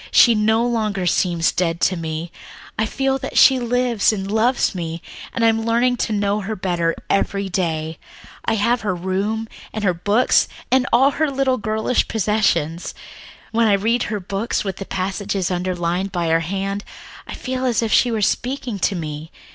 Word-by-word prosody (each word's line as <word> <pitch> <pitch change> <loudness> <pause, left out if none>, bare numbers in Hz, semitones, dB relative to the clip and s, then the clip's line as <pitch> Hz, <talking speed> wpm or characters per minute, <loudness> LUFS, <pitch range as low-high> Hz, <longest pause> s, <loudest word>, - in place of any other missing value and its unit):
She 235 - +6
no 220 +2 +2
longer 215 -6 -1
seems 170 -1 +2
dead 170 -2 -1
to 185 - +3
me. 165 0 -4 0.4
I 220 - 0
feel 270 +3 0
that - - -5
she 265 -1 +7
lives 245 -3 +2
and 195 -2 -4
loves 230 +3 +2
me, 165 -2 -4 0.3
and 230 - 0
I - - +6
am 225 0 +2
learning 240 +2 +2
to 225 - -1
know 205 0 +1
her 215 +2 -4
better 175 -4 -1
every 200 0 0
day. 160 -3 -2 0.4
I 225 - +1
have 235 +3 +1
her 205 -4 -1
room 195 +5 -2 0.2
and 215 - -4
her 185 -3 +3
books 205 +8 +2 0.2
and 255 -1 +3
all 265 +4 +5
her 310 +1 0
little 270 -1 0
girlish 220 +3 0
possessions. 190 -7 0 0.6
When 230 0 +3
I 205 - +4
read 225 +4 +1
her 210 -1 -2
books, 195 +4 -2
with 195 -3 -4
their 195 - -6
passages 195 0 -2
underlined 180 +1 -1
by 170 -2 -1
her 165 0 +3
hand, 195 +4 -3 0.4
I - - -6
feel 255 0 -4
as 235 -2 +1
if 220 - 0
she 245 - +4
were 220 -3 -1
speaking 245 0 -1
to 195 - +1
me. 155 -2 -5
205 Hz, 180 wpm, -20 LUFS, 180-230 Hz, 0.6 s, she